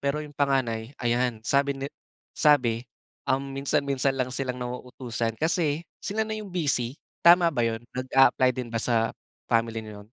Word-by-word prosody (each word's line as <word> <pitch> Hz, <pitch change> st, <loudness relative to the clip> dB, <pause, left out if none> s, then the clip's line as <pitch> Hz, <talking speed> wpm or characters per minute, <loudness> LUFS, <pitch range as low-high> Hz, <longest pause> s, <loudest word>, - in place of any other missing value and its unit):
pero 145 Hz, +2 st, -1 dB
'yong 150 Hz, -, -11 dB
panganay 135 Hz, -3 st, 0 dB
ayan, 120 Hz, -2 st, 0 dB
sabi 140 Hz, +1 st, +2 dB
ni 135 Hz, 0 st, -4 dB, 0.5 s
sabi, 125 Hz, -7 st, +3 dB, 0.5 s
um, 135 Hz, +1 st, 0 dB
minsan-minsan 135 Hz, 0 st, 0 dB
lang 130 Hz, -1 st, -1 dB
silang 130 Hz, -2 st, -2 dB
nauutusan 125 Hz, -2 st, -4 dB
kasi 160 Hz, 0 st, 0 dB, 0.2 s
sila 220 Hz, +2 st, -1 dB
na 220 Hz, -, -5 dB
'yong 215 Hz, -1 st, -6 dB
busy, 140 Hz, -8 st, -1 dB, 0.2 s
tama 170 Hz, 0 st, +6 dB
ba 125 Hz, -, -1 dB
yun? 115 Hz, 0 st, -1 dB
Nag-apply 130 Hz, 0 st, +4 dB
din 120 Hz, -2 st, -5 dB
ba 115 Hz, -, 0 dB
sa 115 Hz, -1 st, +1 dB, 0.3 s
family 115 Hz, -1 st, 0 dB
niyo 105 Hz, -1 st, -9 dB
'yon? 105 Hz, -, -21 dB
130 Hz, 160 wpm, -26 LUFS, 115-145 Hz, 0.5 s, tama